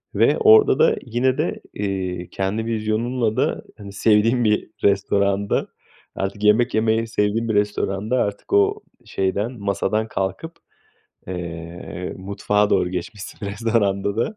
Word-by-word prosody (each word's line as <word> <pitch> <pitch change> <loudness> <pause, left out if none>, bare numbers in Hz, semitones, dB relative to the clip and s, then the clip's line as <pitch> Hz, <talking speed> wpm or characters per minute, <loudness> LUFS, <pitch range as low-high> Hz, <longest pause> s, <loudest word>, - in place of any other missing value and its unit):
ve - - +4
orada 435 -1 +6
da 475 0 +5
yine 125 +2 0
de, - - -2
iii, 95 -3 -3
kendi 100 +4 -2
vizyonunla 115 +1 -1
da, - - 0
hani, 100 -2 -9
sevdiğin 110 +4 +3
bir 105 0 +1
restoranda, 100 0 +1 0.5
artık 100 +2 -4
yemek 110 +4 +4
yemeyi 110 +1 +1
sevdiğin 110 +1 0
bir - - +1
restoranda, 105 +2 0
artık 100 - -5
o 405 +1 +3 0.2
şeyden, 100 +2 -1
masadan 100 +2 -1
kalkıp, 105 - -3 0.8
eee, 85 0 -6
mutfağa 100 +2 0
doğru 90 - +2
geçmişsin 95 +3 -6
restoranda 100 -2 0
da. 120 - -1
105 Hz, 125 wpm, -22 LUFS, 100-115 Hz, 0.8 s, orada